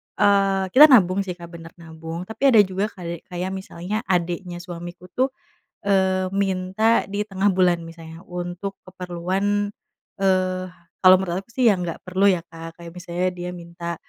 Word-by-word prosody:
eee, 195 -1 +3
kita 285 +7 +10
nabung 200 - +5
sih, 180 -2 -5
Kak, 170 -1 -10
bener, 165 -1 -10
nabung, 165 +1 -7
tapi 220 - -8
ada - - +8
juga 190 +2 -2
kali 170 -2 -6
kayak 180 +1 -4
misalnya 190 +2 -4
adiknya 175 0 -1
suamiku 175 0 -9
tuh, 255 +7 +1 0.6
eee, 190 -1 +2
minta 195 +3 +1
di 200 +1 -2
tengah 195 -1 -1
bulan 180 -2 +3
misalnya 165 0 -11
untuk 180 +2 -5
keperluan, 185 +3 -2 0.5
eee, 185 -1 +1 0.4
kalau 185 0 +9
menurut 185 0 -3
aku - - -22
sih 250 0 +3
yang 185 -3 -1
nggak 170 - -5
perlu 185 +2 0
ya, 180 -2 -1
Kak, 165 0 -10
kayak 170 0 -9
misalnya 180 0 -2
dia 175 0 -5
minta 170 0 -6
185 Hz, 160 wpm, -23 LUFS, 175-195 Hz, 0.6 s, kita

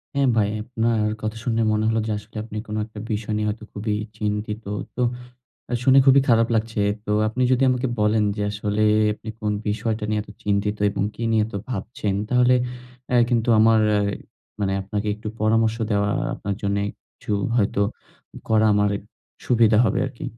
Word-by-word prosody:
হ্যাঁ, 140 -1 +3
ভাই। 105 -2 +3
আপনার 115 -1 0 0.2
কথা 110 +1 -3
শুনে 115 -2 +1
মনে 105 0 +1
হলো 115 0 +1
যে - - -1
আসলে 105 +2 -19
আপনি 110 -1 -8
কোনো 105 0 -3
একটা 110 -1 -11
বিষয় 105 0 -2
নিয়ে 105 0 0
হয়তো 110 +1 -5
খুবই 105 +1 -2 0.2
চিন্তিত। 105 +1 -3 0.3
তো 125 - -2 0.7
অ্যা 120 - -3
শুনে 130 +1 +6
খুবই 135 +1 +7
খারাপ 115 -1 +4
লাগছে। 110 -1 -1 0.2
তো - - -5 0.2
আপনি 125 +4 -2
যদি 130 +1 +3
আমাকে 125 +1 0
বলেন, 105 0 +3
যে 105 - -2
আসলে 105 0 -1 0.3
আপনি 110 - -12
কোন 105 -1 0 0.2
বিষয়টা 110 +1 -1
নিয়ে 105 0 0
এত 105 - -15
চিন্তিত 105 +1 0
এবং 100 - -2
কী - - -7
নিয়ে 110 -1 +3
এত 110 - -12 0.2
ভাবছেন? 105 -2 -3
তাহলে 125 +1 +4 0.5
অ্যা 125 - +2
কিন্তু 115 -1 +1
আমার 110 0 +5
অ্যা 105 - +3 0.6
মানে 95 -1 0
আপনাকে 100 +2 -3
একটু 110 +1 -7
পরামর্শ 110 +1 +2
দেওয়া 100 -1 +2 0.3
আপনার 100 0 -3
জন্যে 100 0 0 0.3
কিছু - - -6 0.2
হয়তো 100 -3 +1 0.7
করা 110 0 +4
আমার 100 0 +1 0.4
সুবিধা 115 -3 +4
হবে 100 - +1
আরকি। 130 -2 -8
110 Hz, 175 wpm, -23 LUFS, 105-115 Hz, 0.7 s, খুবই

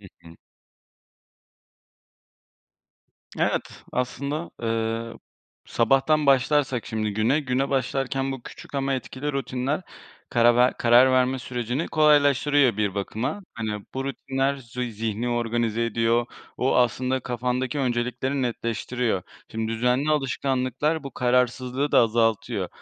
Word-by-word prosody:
Hı 100 - -13 0.2
hı. 85 0 -14 3.0
Evet, - - -2
aslında, 140 +5 -3
ııı, 115 0 -2 0.5
sabahtan 135 +5 +2
başlarsak 135 -2 +2
şimdi 110 -2 -2
güne, 110 +8 +2
güne 135 0 -1
başlarken 135 0 -1
bu 130 -3 -7
küçük - - -12
ama 135 0 0
etkili 130 +2 -4
rutinler 135 +2 -2 0.5
karar 120 0 +4
ver 125 +1 +4
karar 120 +2 +5
verme 130 0 +2
sürecini 125 +3 -3
kolaylaştırıyor 145 -4 +4
bir 105 -3 0
bakıma. 110 - -3
Hani, 105 -3 -4
bu 135 0 -2
rutinler, 135 0 -1
zu 125 -1 -6
zihni 115 0 -3
organize 115 -1 0
ediyor. 115 +1 +1 0.3
O, 130 - +1
aslında 125 +2 +1
kafandaki 125 +2 -2
öncelikleri 125 +1 -1
netleştiriyor. 115 -3 -2 0.3
Şimdi 110 0 -3
düzenli 125 +6 +1
alışkanlıklar 135 +1 0
bu 140 - -5
kararsızlığı 125 +2 0
da - - +6
azaltıyor. 115 -1 +1
125 Hz, 115 wpm, -25 LUFS, 115-135 Hz, 3.0 s, da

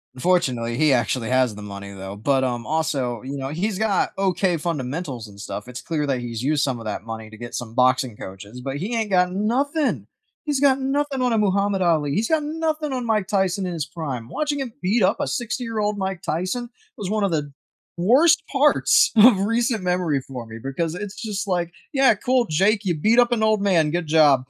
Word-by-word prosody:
Unfortunately, 125 -7 +1
he 155 +3 +3
actually 120 -1 +1
has 130 -3 +2
the 105 - -9
money, 100 -1 -8
though, 95 +1 -7
but, 130 +5 +1
um, 120 -2 -2
also, 135 -7 -1
you 140 +2 -6
know, 135 0 -4
he's 185 +6 -2
got 210 -2 +1
okay 190 -2 +1
fundamentals 145 -5 -4
and 100 -1 -15
stuff. 105 +2 -6
It's 125 0 -7
clear 150 -3 -2
that 135 -3 0
he's 120 -2 -5
used 145 +2 +1
some 130 -4 -1
of 115 - -9
that 105 0 -4
money 110 -1 -7
to 110 - -13
get 120 +1 -8
some 115 -2 -5
boxing 130 -3 +2
coaches, 100 +6 -9
but 135 +2 -4
he 205 +10 -3
ain't 220 -3 -1
got 180 -1 +3
nothing. 270 - 0 0.4
He's 290 -3 0
got 275 -1 +4
nothing 275 0 -1
on 250 -1 +2
a 225 - +2
Muhammad 200 -1 +1
Ali; 155 -5 +2
he's 220 +3 +1
got 320 -1 +2
nothing 310 -1 -2
on 255 -2 -2
Mike 215 -4 +1
Tyson 190 -2 0
in 180 - -3
his 160 -4 -3
prime. 130 -8 -6
Watching 295 - -2
him 245 -4 -5
beat 200 +4 +2
up 185 - +3
a - - -1
60 245 +1 -3
year 230 -2 -4
old 210 0 0
Mike 190 -2 -3
Tyson 185 +9 -2 0.3
was 200 - -4
one 215 -1 0
of 200 - +2
the 150 -4 -2 0.4
worst 270 - +5
parts 290 +1 +4
of 215 -2 +7
recent 230 0 0
memory 180 -6 0
for 125 -4 -7
me, 110 0 -9
because 135 +7 -3
it's 205 +1 -6
just 210 -2 -3
like, 175 -2 -1 0.2
"Yeah, 270 -5 +5
cool, 245 +3 +1
Jake, 195 +7 +2
you 180 -4 0
beat 215 +10 +3
up 245 0 +4
an 220 -2 +1
old 215 -1 +3
man. 170 -7 +2
Good 175 0 -2
job." 145 -4 +4
180 Hz, 220 wpm, -23 LUFS, 130-220 Hz, 0.4 s, of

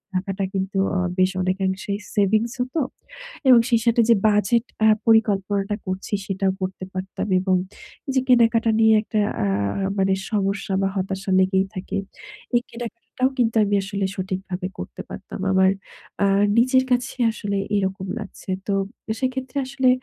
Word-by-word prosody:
টাকাটা 195 +1 -2
কিন্তু 195 0 -2 0.2
অ - - +2 0.2
বেশ 185 0 +4
অনেকাংশেই 190 +2 -1 0.2
সেভিংস 215 +3 +2
হতো। 255 +6 -2 0.7
এবং 245 -2 +8
সেই 235 -2 +4
সাথে 235 0 +4
যে 230 - +7
বাজেট 210 +3 +2 0.2
আ - - +7 0.2
পরিকল্পনাটা 205 -2 +2
করছি, 185 +2 -4
সেটাও 195 0 0
করতে 185 0 -4
পারতাম। 190 +2 -4
এবং 185 0 +1 0.5
এইযে 265 -1 +1
কেনাকাটা 230 -2 +4
নিয়ে 220 0 +6
একটা 215 0 -2 0.3
আ - - +1 0.4
আ - - +1
মানে 190 0 +3 0.2
সমস্যা 200 -1 -1
বা 195 - +2
হতাশা 190 0 -2
লেগেই 190 0 +3
থাকে, 185 +1 -4 0.6
এই 240 - +4
কেনাকাটাটাও 240 +2 -3
কিন্তু 230 -2 +1
আমি 205 0 +1
আসলে 200 0 -2
সঠিকভাবে 185 -1 -4
করতে - - -7
পারতাম। 195 - -8
আমার 190 0 +4 0.5
আ - - +5 0.3
নিজের 255 +2 +4
কাছে 250 +1 +1 0.2
আসলে 205 -2 -3 0.2
এইরকম 190 -1 -1
লাগছে। 205 -2 -10 0.2
তো 200 - +1 0.5
সেক্ষেত্রে 260 0 -2
আসলে 260 0 +1
200 Hz, 145 wpm, -23 LUFS, 190-235 Hz, 0.7 s, এবং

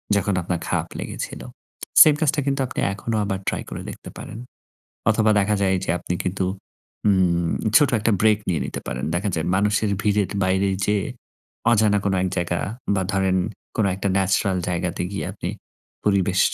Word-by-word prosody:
যখন 100 0 +1
আপনার 85 0 -2
খারাপ - - -1
লেগেছিল। - - -5 0.6
সেইম 155 -2 +9
কাজটা 150 -1 +2
কিন্তু 140 0 +1
আপনি - - -5
এখনো 110 +3 -3
আবার 95 -1 -2
ট্রাই - - -1
করে - - -6
দেখতে - - -9
পারেন। 115 - -8 0.7
অথবা 110 0 +3
দেখা 105 +2 +1
যায় 95 -1 +3
যে - - -1
আপনি 90 - -3
কিন্তু 95 +1 -1 0.6
ম - - +6 0.7
ছোট 145 +1 +5
একটা 110 +1 +2
ব্রেক 110 -1 +4
নিয়ে 85 -4 +1
নিতে - - -5
পারেন। 65 +2 -3
দেখা 95 +4 0
যায় 80 - -1
মানুষের 105 +1 +2
ভিড়ের 105 -2 +1
বাইরে 95 +1 +2 0.2
যেয়ে 105 -2 +1 0.7
অজানা 105 -2 +4
কোন 100 - +1
এক 95 - +1
জায়গা 85 0 0 0.4
বা 95 - +1
ধরেন 95 -1 +2 0.4
কোনো 105 -3 +2
একটা 100 +1 -2
ন্যাচারাল 95 0 +2
জায়গাতে 90 0 -2
গিয়ে 100 - -3
আপনি - - -5 0.6
পরিবেশ 95 -2 +2
100 Hz, 165 wpm, -23 LUFS, 95-105 Hz, 0.7 s, সেইম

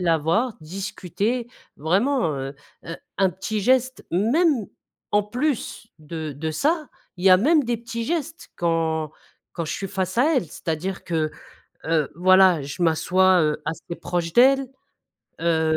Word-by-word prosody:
la 170 -2 +3
voir», 185 - +1
discuter 195 +7 -3 0.3
vraiment, 185 - +1
heu, 135 +1 -5 0.3
heu, 165 - -5 0.2
un 190 -1 +3
petit 190 +4 -4
geste. 255 +4 +1
Même, 240 - +2 0.4
en 205 0 +2
plus 245 0 -2
de 155 0 -6
de 160 +2 -3
ça, 305 - 0 0.3
il 180 - -7
y 190 - +7
a 185 - +9
même 295 - +3
des 240 0 0
petits 230 0 -5
gestes 325 +1 -4
quand 160 -2 0 0.4
quand 170 - -3
je 155 - -4
suis 195 - -4
face 190 +2 -2
à 300 +4 +4
elle, 255 - +1
c'est-à-dire 165 +4 -4
que, 160 -3 -1 0.5
heu, 160 -3 +1
voilà, 185 -1 +5
je 145 +6 -5
m'assois, 180 +3 +3
heu, 150 -1 0
assez 165 +2 -5
proche 170 -1 -3
d'elle, 270 +4 +5 0.7
heu, 160 -1 +2
185 Hz, 150 wpm, -23 LUFS, 165-240 Hz, 0.7 s, a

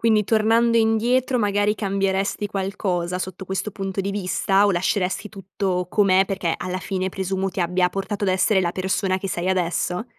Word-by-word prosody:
Quindi, 220 -2 +3
tornando 225 +2 +3
indietro 240 +3 +2
magari 205 0 +1
cambieresti 195 0 -1
qualcosa 190 -3 -2
sotto 185 +1 -6
questo 190 +2 -3
punto 195 0 -3
di 195 +1 -3
vista? 195 0 +1
O 205 - +4
lasceresti 190 +2 -1
tutto 190 -3 -3
com'è, 195 -2 +4
perché 190 -4 -2
alla 185 0 -4
fine 190 -1 -2
presumo 190 0 -2
ti 190 - -8
abbia 180 +1 +2
portato 195 +2 -4
ad 195 - +2
essere 190 +2 +3
la 175 - 0
persona 185 +1 -1
che 195 - -5
sei 180 0 -2
adesso. 180 +2 0
195 Hz, 170 wpm, -22 LUFS, 185-205 Hz, -, O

